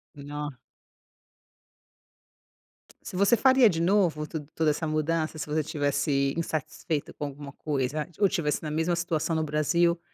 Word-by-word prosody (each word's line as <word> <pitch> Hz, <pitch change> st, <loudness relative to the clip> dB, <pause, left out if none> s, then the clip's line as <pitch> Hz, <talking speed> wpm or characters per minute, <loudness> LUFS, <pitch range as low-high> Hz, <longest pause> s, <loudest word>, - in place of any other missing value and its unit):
Nossa. 145 Hz, -1 st, -6 dB, 2.5 s
Se -, -, -7 dB
você 200 Hz, +5 st, +4 dB
faria 260 Hz, 0 st, +6 dB
de 165 Hz, -3 st, -1 dB
novo, 170 Hz, -5 st, +2 dB
tuda 155 Hz, -3 st, -6 dB
toda 160 Hz, -1 st, +2 dB
essa 160 Hz, +2 st, -2 dB
mudança? 155 Hz, +1 st, 0 dB
Se -, -, -3 dB
você 155 Hz, +1 st, +1 dB
estivesse 145 Hz, -2 st, 0 dB
insatisfeito 155 Hz, -1 st, -3 dB
com 145 Hz, -, -4 dB
alguma 140 Hz, 0 st, -8 dB
coisa, 145 Hz, 0 st, -2 dB
ou 205 Hz, -, +5 dB
tivesse 165 Hz, -6 st, -1 dB
na 150 Hz, -, -3 dB
mesma 160 Hz, +3 st, +1 dB
situação 170 Hz, -1 st, -1 dB
no 160 Hz, -, +1 dB
Brasil, 170 Hz, +3 st, +2 dB
155 Hz, 140 wpm, -27 LUFS, 145-170 Hz, 2.5 s, faria